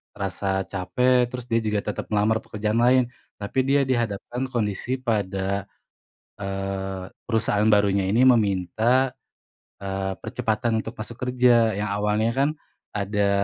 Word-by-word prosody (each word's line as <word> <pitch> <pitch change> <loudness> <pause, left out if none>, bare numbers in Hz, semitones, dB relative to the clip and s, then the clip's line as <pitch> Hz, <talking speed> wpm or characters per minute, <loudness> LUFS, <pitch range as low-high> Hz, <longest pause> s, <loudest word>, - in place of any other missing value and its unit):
rasa 95 0 -2
capek 120 +8 +1
terus 125 0 -7
dia 115 - +4
juga 105 -2 -1
tetap - - -5
melamar 105 +1 +2
pekerjaan 105 0 -2
lain, 125 +2 +5 0.3
tapi 105 +6 -3
dia 140 +1 +4
dihadapkan 120 0 -2
kondisi 120 +1 -2
pada, 100 -5 -1 0.8
eee, 95 -1 -4 0.2
perusahaan 110 -2 +2
barunya 100 -2 +3
ini 115 +6 +4
meminta, 115 +3 +3 0.7
eee, 95 0 -2
percepatan 110 -1 -1
untuk 115 - -7
masuk 110 +2 -7
kerja, 125 -3 +4
yang 105 +1 -2
awalnya 105 +2 +1
kan 140 +1 +4 0.5
ada 100 0 0
105 Hz, 125 wpm, -24 LUFS, 100-120 Hz, 0.8 s, lain